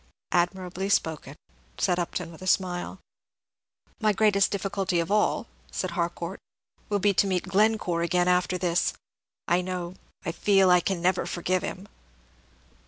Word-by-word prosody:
"Admirably 180 +2 0
spoken," 155 -7 0 0.4
said 180 -2 +1
Upton, 170 -1 -3
with 165 - -14
a 185 - -6
smile. 185 0 0 1.0
"My 215 -1 +3
greatest 200 -1 +3
difficulty 195 -2 -1
of 170 +3 -2
all," 210 +2 +2 0.2
said 185 - -3
Harcourt, 170 +2 -3 0.5
"will 205 - +2
be 200 +1 +2
to 200 - +3
meet 185 -2 0
Glencore 195 -3 +2
again 175 +1 +1
after 180 0 +2
this. 175 -1 +1 0.5
I 175 +2 +3
know 180 -1 -4 0.3
I - - -1
feel 195 +1 +4
I 180 0 +6
never 185 -1 +1
can - - -5
forgive 180 +1 -1
him." 190 +2 -6
185 Hz, 145 wpm, -27 LUFS, 175-195 Hz, 1.0 s, I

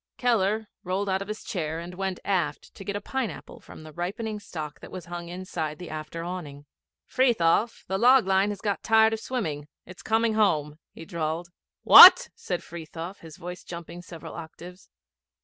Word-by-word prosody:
Keller 220 -3 +1 0.2
rolled 190 +2 -2
out 190 0 0
of 195 - -6
his 215 +1 -6
chair 160 -5 -3
and 170 +2 -7
went 190 0 -4
aft 175 -7 -2
to - - -11
get 200 0 -4
a 205 - -3
pineapple 245 -4 -5
from - - -13
the 155 -1 -12
ripening 210 +6 -4
stock 155 -7 -8
that - - -11
was 185 -3 -8
hung 175 0 -7
inside 175 -4 -5
the 180 -1 -9
after 155 +2 -6
awning. 155 -5 -7 0.4
'Frithiof, 230 -3 +1
the 190 0 -2
log 250 0 +6
line 195 +1 +2
has 205 -2 -6
got 205 -2 -2
tired 220 0 +4
of 225 - -3
swimming. 160 - -4 0.2
It's 185 +1 -12
coming 225 0 +1
home,' 155 -8 +1
he 165 - -11
drawled. 165 -1 -4 0.3
'What?' - - +10
said 180 -2 -5
Frithiof, 170 +3 -8
his 160 -2 -13
voice 180 +1 -8
jumping 170 0 -9
several 170 -3 -10
octaves. 175 +3 -11
180 Hz, 180 wpm, -26 LUFS, 165-205 Hz, 0.4 s, What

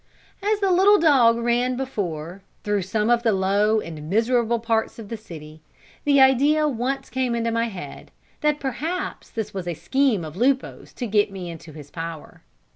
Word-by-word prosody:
As 415 +1 +1
the 390 -1 +2
little 390 +3 +6
dog 260 -9 +5
ran 240 +2 0
before, 185 - -4 0.2
through 205 -1 0
some 210 +5 0
of 240 -1 +3
the 230 -2 +2
low 200 +3 +2
and 155 -5 -8
miserable 235 +3 +2
parts 225 -1 -1
of 220 -3 -9
the 230 - -4
city, 160 -7 -11 0.4
the 285 -1 +4
idea 285 +4 +4
once 265 +1 -2
came 255 -2 -1
into 230 0 -1
my 230 0 +1
head 195 -5 -9 0.3
that 300 -1 +1
perhaps 315 +7 -4
this 220 -2 -5
was 190 -2 -5
a 175 - -2
scheme 215 - +1
of 155 0 -9
Lupo's 260 +6 -1
to 250 - -5
get 205 -2 +2
me 185 -3 -6
into 160 -1 -11
his 150 -1 -12
power. 165 -2 -7
230 Hz, 180 wpm, -23 LUFS, 190-265 Hz, 0.4 s, little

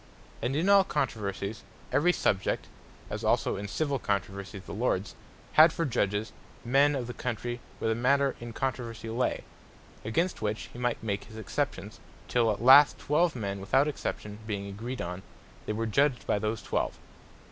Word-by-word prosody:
And 125 +4 -1
in 165 +5 +1
all 200 -1 +7
controversies, 110 - -2 0.3
every 175 +5 +4
Subject 95 - 0 0.5
(as - - -4
also - - +2
in 100 +1 -5
civill 140 +5 -1
controversies 100 -2 -3
the - - -8
Lords) 105 -3 -1 0.4
had 155 +1 +8
for 165 +1 -1
Judges, 105 -5 0 0.3
men 140 +4 +4
of 130 -3 -2
the 125 - -6
Country 120 0 -3 0.2
where - - -1
the - - +3
matter 135 +3 +2
in 120 0 -7
controversie 115 -3 -3
lay; 125 +1 0 0.6
against 165 - 0
which 105 0 -3
he 120 - -9
might 120 -2 -1
make 100 -2 -2
his 110 - -12
exceptions, 100 -8 -3 0.3
till 120 -2 +2
at 105 +2 -4
last 135 +3 +8
Twelve 160 +2 +1
men 100 -4 -3
without 130 +9 +2
exception 105 -7 -4
being 100 -2 -3
agreed 115 +6 -5
on, 90 +2 -5 0.5
they - - 0
were 115 +2 -1
Judged 135 +3 +2
by 105 - +1
those 110 +1 -2
twelve. - - -1
115 Hz, 170 wpm, -29 LUFS, 105-135 Hz, 0.6 s, had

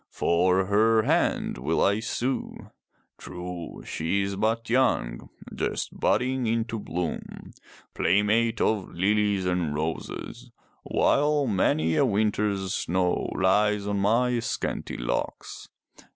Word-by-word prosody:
"For 90 +2 +2
her 110 +3 +3
hand - - 0
will 75 +6 0
I 100 +2 +2
sue. 125 +3 -3 0.5
True, 90 -1 -7
she 95 +5 -1
is 100 0 -3
but 110 +3 0
young, 115 - 0 0.2
just - - -2
budding 130 -1 +1
into 115 0 -1
bloom, 90 -5 -5 0.4
playmate 105 +4 +2
of 105 -4 +1
lilies 100 +1 +1
and 90 -5 0
roses, 80 +2 -5 0.3
while 145 0 +2
many 80 -7 +1
a - - +4
winter's 105 -3 0
snow 90 +1 0
lies 105 +2 +2
on 100 -1 -1
my 120 +4 +2
scanty 115 - -3
locks. - - -4
100 Hz, 110 wpm, -26 LUFS, 90-115 Hz, 0.5 s, a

